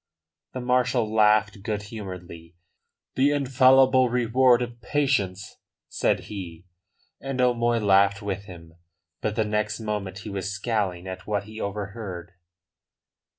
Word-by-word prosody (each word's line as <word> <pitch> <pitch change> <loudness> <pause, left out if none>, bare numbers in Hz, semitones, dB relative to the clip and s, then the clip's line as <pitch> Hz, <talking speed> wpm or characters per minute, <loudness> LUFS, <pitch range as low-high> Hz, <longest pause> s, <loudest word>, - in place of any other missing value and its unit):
The 130 - -4
marshal 125 -3 +1
laughed 105 -1 +3
good 105 0 -3
humouredly. 90 -6 -9 0.6
"The 135 +2 +3
infallible 130 -2 +4
reward 125 +1 +3
of 120 -1 -8
patience," 115 -10 -1 0.3
said - - 0
he. 90 -4 -8 0.5
And 135 -1 -5
O'Moy 120 -1 +2
laughed 100 -1 +4
with 100 -1 -4
him. 85 -4 -12 0.5
But 105 -1 -2
the 110 - +1
next 105 0 -1
moment 105 -3 -4
he 110 - -7
was 95 0 -3
scowling 100 -4 -2
at 95 0 -8
what 105 -2 -1
he 110 +1 -9
overheard. 100 -3 -5
105 Hz, 125 wpm, -25 LUFS, 95-120 Hz, 0.6 s, infallible